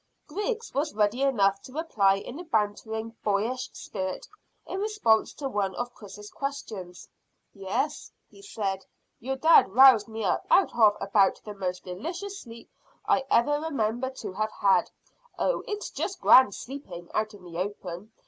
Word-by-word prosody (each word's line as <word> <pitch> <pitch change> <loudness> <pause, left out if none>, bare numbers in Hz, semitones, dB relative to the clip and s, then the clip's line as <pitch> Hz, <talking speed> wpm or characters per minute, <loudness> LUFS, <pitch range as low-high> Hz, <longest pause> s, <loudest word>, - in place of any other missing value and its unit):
Griggs 435 +7 -4
was 295 -1 -1
ready 215 +4 +1
enough 200 -8 +2
to - - -12
reply 215 -12 +2
in 240 +9 -7
a - - -6
bantering, 220 -3 -2
boyish 220 +5 -1
spirit 190 -2 -5 0.4
in 380 - -4
response 415 - +2
to 280 - -5
one 200 -6 -1
of 245 0 -4
Chris's 210 -1 -11
questions. 215 -10 -6 0.5
"Yes," 195 -2 -3 0.2
he - - -17
said; 195 - -3 0.4
"your 265 +3 -3
dad 275 -2 +6
roused 245 0 +7
me 220 0 -5
up 190 - 0
out 385 - +4
of 215 -3 +5
about 195 0 +2
the 210 - -6
most 180 -2 -4
delicious 350 - -6
sleep 230 -5 -13 0.3
I 270 - +2
ever 290 +5 +3
remember 260 -5 -1
to 260 -7 -7
have 215 +2 -2
had. 200 +3 +3 0.5
Oh, - - 0
it's 420 0 -4
just 390 -2 -4
grand 255 -6 +6
sleeping 185 -11 -9
out 215 0 -1
in 195 - -16
the 170 -1 -7
open. 190 +1 -5
220 Hz, 160 wpm, -27 LUFS, 200-275 Hz, 0.5 s, roused